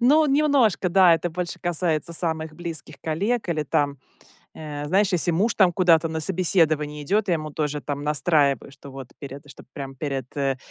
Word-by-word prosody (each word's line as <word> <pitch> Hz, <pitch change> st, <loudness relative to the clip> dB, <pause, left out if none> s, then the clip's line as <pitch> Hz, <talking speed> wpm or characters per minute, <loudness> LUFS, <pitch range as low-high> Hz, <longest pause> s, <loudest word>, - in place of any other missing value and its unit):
Ну, 300 Hz, +6 st, +5 dB
немножко, 275 Hz, -10 st, +2 dB
да. 180 Hz, -1 st, +6 dB
Это 165 Hz, +2 st, -2 dB
больше 175 Hz, +1 st, -4 dB
касается 170 Hz, -2 st, -1 dB
самых 160 Hz, -2 st, -2 dB
близких 170 Hz, -1 st, -6 dB
коллег 200 Hz, +8 st, -1 dB
или 155 Hz, -3 st, 0 dB
там, 140 Hz, -1 st, 0 dB, 0.6 s
э, 150 Hz, -1 st, -6 dB
знаешь, 195 Hz, +4 st, +2 dB
если 175 Hz, 0 st, +2 dB
муж 200 Hz, +7 st, +1 dB
там 185 Hz, -4 st, +4 dB
куда-то 165 Hz, -3 st, +3 dB
на 160 Hz, 0 st, -3 dB
собеседование 155 Hz, -4 st, +1 dB
идет. 200 Hz, +7 st, 0 dB
Я 175 Hz, -, +3 dB
ему 155 Hz, -1 st, -4 dB
тоже 150 Hz, 0 st, -2 dB
там 145 Hz, 0 st, -4 dB
настраиваю, 145 Hz, -2 st, +1 dB
что 140 Hz, 0 st, -13 dB
вот 135 Hz, -2 st, -9 dB
перед 140 Hz, 0 st, -9 dB
чтоб -, -, -14 dB
прям 135 Hz, -1 st, -7 dB
перед, 135 Hz, -3 st, -3 dB
э, 135 Hz, -1 st, 0 dB
160 Hz, 180 wpm, -24 LUFS, 145-180 Hz, 0.6 s, да